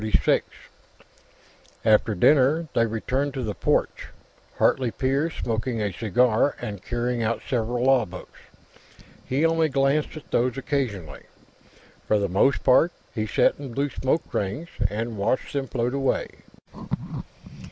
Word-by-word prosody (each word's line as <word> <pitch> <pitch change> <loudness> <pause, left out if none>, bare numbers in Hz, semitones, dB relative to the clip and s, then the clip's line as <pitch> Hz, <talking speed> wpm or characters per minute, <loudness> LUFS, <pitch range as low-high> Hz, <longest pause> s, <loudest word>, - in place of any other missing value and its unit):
After 110 0 +4
dinner, 150 - +4
they 115 - +3
returned 130 +6 -2
to 130 - -3
the 105 -2 -2
porch, - - 0 0.5
Hartley 125 -3 +2
père 135 +7 0
smoking 115 -2 -2
a 105 -2 -1
cigar 115 +6 +2
and 100 -3 -6
carrying 120 0 -2
out 115 0 -1
several 120 -1 -1
law 130 -3 +4
books. 90 0 -11 0.8
He 140 +5 0
only 165 -1 +2
glanced 140 +3 +1
at 155 - -12
these 125 +1 +1
occasionally; 120 - -3 0.8
for 105 - +3
the 100 -1 0
most 100 +9 +2
part, 140 +6 +5 0.2
he 110 -2 -2
sat - - +2
and 135 -5 -7
blew 140 0 0
smoke 135 +5 0
rings, 105 - -2 0.2
and 110 +2 -4
watched 100 +9 -1
them 140 -2 -2
float 120 0 -1
away. 135 -1 0
125 Hz, 130 wpm, -25 LUFS, 110-140 Hz, 0.8 s, part